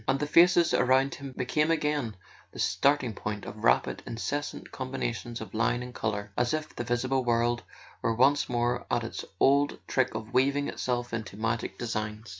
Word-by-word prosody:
And 135 - +2
the 150 - 0
faces 170 +2 +5
around 130 +2 +3
him 140 -2 -8
became 150 +5 0
again 150 -8 0 0.4
the - - -13
starting 140 -4 +2
point 105 0 -5
of 105 +1 -8
rapid - - +2
incessant 145 +6 -4
combina¬ 130 -2 -3
tions 115 +2 -7
of 105 -4 -8
line 120 +2 +1
and 125 0 -8
colour, 105 -3 -3
as 120 +4 +1
if 155 0 -6
the - - -3
visible 125 +2 0
world 120 0 +1 0.4
were 115 - +1
once 140 +4 +3
more 120 0 0
at 120 - +1
its 115 - -5 0.2
old 140 +1 +4
trick 130 -4 +1
of 110 +1 -6
weaving 140 +3 +2
itself 120 -1 -2
into 110 -3 -4
magic 110 +1 -2
designs. 110 -1 -4
120 Hz, 180 wpm, -28 LUFS, 115-140 Hz, 0.4 s, faces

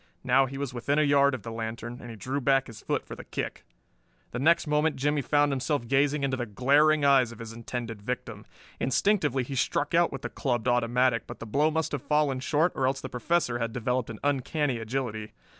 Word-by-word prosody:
Now 130 +1 +4
he 135 +1 -7
was 140 -3 -4
within 140 +4 -1
a 155 - +4
yard 140 -1 +4
of 120 - -9
the 115 - -6
lantern, 115 +2 -5
and 120 - -9
he 115 - -7
drew 130 +7 -3
back 135 0 +3
his 115 -3 -11
foot - - -2
for - - -8
the - - -9
kick. - - -5 0.7
Next 165 +8 +3
moment 150 0 +1
Jimmie 145 +2 0
found 145 +2 +2
himself 135 -1 -1
gazing 140 +2 +2
into 135 -1 +1
the 120 -2 -3
glaring 145 +7 +3
eyes 135 -4 +5
of 115 - -11
his 115 0 -8
intended 115 -2 -6
victim. 125 +4 -5 0.3
Instinctively 145 - +1
he 135 - -6
struck 145 +3 0
out 170 0 +4
with 135 0 -7
the - - -3
clubbed 120 -3 -2
automatic, 120 0 +2
but - - -8
the - - -8
blow 145 +8 +2
must 160 0 -1
have 145 - -3
fallen 150 -3 +1
short, 150 +6 +1
or 130 - 0
else 135 +1 0
the 130 - -6
Professor 125 -2 0
had 115 -1 -2
developed 125 0 -1
an 115 - -6
uncanny 145 -1 0
agility. 110 -2 -4
130 Hz, 215 wpm, -28 LUFS, 120-145 Hz, 0.7 s, eyes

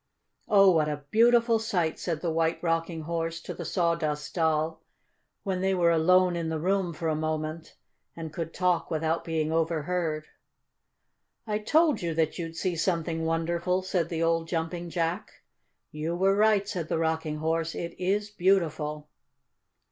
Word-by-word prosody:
"Oh, 195 -3 +6
what 155 -3 +2
a 145 -1 -4
beautiful 235 0 +4
sight!" 180 -8 -1
said 165 -3 -3
the 170 - -1
White 165 0 +1
Rocking 165 0 -1
Horse 165 +1 -3
to - - -6
the 170 - -7
Sawdust 160 -4 -1
Doll, 160 -1 0 0.6
when 190 -3 -2
they 190 0 +1
were 170 -2 +3
alone 180 +2 +4
in 165 -1 -2
the 160 - -1
room 185 +2 0
for 165 +1 -4
a 160 - +1
moment 155 +1 -3 0.4
and 160 -2 -7
could 165 -1 -4
talk 180 -1 0
without 160 0 -1
being 160 -1 -1
overheard. 160 -1 -1 1.2
"I 210 -1 -1
told 300 +4 +3
you 170 -2 -2
that 160 +2 0
you'd 165 -1 -5
see 180 +1 -1
something 165 -1 -1
wonderful," 170 +3 0
said 180 -3 -1
the 165 -1 -1
old 165 0 +1
Jumping 170 +1 -3
Jack. 170 +3 -2 0.6
"You 155 +3 -3
were 195 +2 +3
right," 210 -1 +3
said 180 -6 -3
the - - -1
Rocking 160 -1 -1
Horse. 165 +1 -1
"It 170 0 -4
is 205 +3 0
beautiful!" 155 -6 0
165 Hz, 160 wpm, -27 LUFS, 160-185 Hz, 1.2 s, Oh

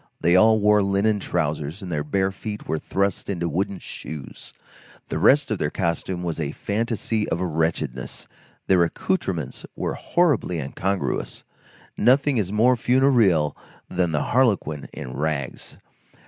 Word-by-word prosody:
They 85 +2 +3
all 110 +3 +6
wore 105 0 +4
linen 100 +2 +2
trousers, 80 +1 -2
and 90 - -6
their 75 -2 -1
bare 95 +5 0
feet 105 +2 -7
were 80 - -1
thrust 100 +4 -1
into 85 -3 -1
wooden 95 +5 -1
shoes. 75 -5 -9 0.6
The - - -2
rest 140 -2 +4
of 110 - -1
their 75 - 0
costume 85 +2 -2
was 85 -2 -3
a 75 -2 -2
fantasy 110 0 -1
of 80 - -1
wretchedness. 80 -7 -2 0.4
Their 95 -2 +4
accoutrements 85 - -2
were - - -2
horribly 150 - +1
incongruous; 95 +8 -2 0.5
nothing 135 0 +3
is 95 -3 -1
more 120 +5 +4
funereal 120 - +3 0.4
than 90 -2 +1
the 75 - 0
harlequin 105 - +1
in 65 - -7
rags. 70 -2 -3
95 Hz, 140 wpm, -24 LUFS, 80-110 Hz, 0.6 s, all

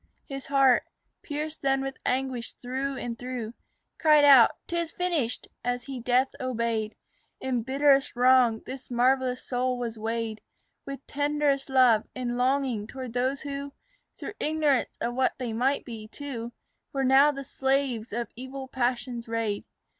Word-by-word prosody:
His 275 -1 -7
heart, 270 -3 +5 0.4
pierced 305 +1 -5
then 270 0 +2
with 270 0 -5
anguish 255 -2 -1
through 265 +2 -3
and 235 -2 -5
through, 245 -3 -5 0.5
Cried 305 -2 +6
out 270 -5 +9 0.2
"'Tis 340 -1 -2
finished," 325 -10 -1 0.2
as 245 0 -1
he 270 -1 -6
death 250 +2 +2
obeyed. 230 -3 -1 0.4
In 255 -3 -1
bitterest 275 +2 +3
wrong 245 -2 +4
this 260 0 -8
marvellous 250 +1 +2
soul 250 0 0
was 235 -2 -4
weighed 225 0 -3 0.5
With 275 0 -7
tenderest 290 -1 0
love 250 -5 +5
and 245 -1 -2
longing 250 -4 +1
towards 255 -1 -7
those 260 +2 0
who, 280 -1 -5 0.4
Through - - -6
ignorance 300 -4 +1
of 240 - -2
what 260 +1 +1
they 245 -3 -3
might 260 +5 +1
be 225 -3 -8
too, 240 -1 -6 0.4
Were 270 -1 0
now 270 +3 +6
the 275 -1 -6
slaves 265 -4 -1
of 235 +1 -3
evil 260 +2 -7
passion's 245 -2 -2
raid. 225 -3 -2
255 Hz, 145 wpm, -27 LUFS, 240-275 Hz, 0.5 s, out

